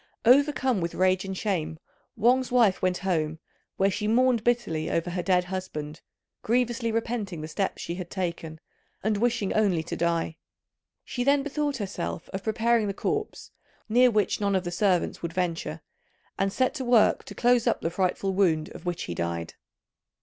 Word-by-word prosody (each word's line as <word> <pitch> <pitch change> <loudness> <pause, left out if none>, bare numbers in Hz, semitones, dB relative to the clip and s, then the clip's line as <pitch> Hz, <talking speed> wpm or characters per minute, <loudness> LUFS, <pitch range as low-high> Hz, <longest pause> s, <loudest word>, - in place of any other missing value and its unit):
Overcome 265 -3 +4
with 170 0 -3
rage 185 0 +2
and 190 -1 -4
shame, 175 -7 -2 0.4
Wang's 250 +3 +2
wife 230 -6 +4
went 185 -1 +1
home, 160 -4 0 0.4
where 195 +1 +3
she 210 +2 -2
mourned 240 0 +3
bitterly 230 -11 0
over 165 +1 -1
her 180 0 -2
dead 180 0 +2
husband, 180 -4 -6 0.4
grievously 240 0 0
repenting 220 -6 -2
the 155 - -5
steps 190 +4 -2
she 170 - -4
had 175 -1 -6
taken, 170 -4 -4 0.4
and 215 0 +1
wishing 230 -3 0
only 195 -7 +2
to 170 - -5
die. 170 -1 -1 0.7
She 245 - -3
then 280 +1 +3
bethought 290 -1 -2
herself 85 - -4
of 190 - -5
preparing 225 +1 +1
the 200 - -3
corpse, 425 - -3 0.4
near 245 +3 +5
which 210 -2 +1
none 200 -1 +1
of 185 - +1
the 175 - -4
servants 185 -1 +1
would 170 -1 -4
venture; 175 -2 -2 0.5
and 195 0 0
set 255 +5 +1
to 280 -3 -4
work 240 -3 +4
to - - -9
close 245 -1 +3
up - - +1
the 165 - -1
frightful 190 +1 0
wound 170 -5 +2
of - - -10
which 175 -1 -2
he 85 - -4
died. 85 0 -3
195 Hz, 175 wpm, -27 LUFS, 175-235 Hz, 0.7 s, near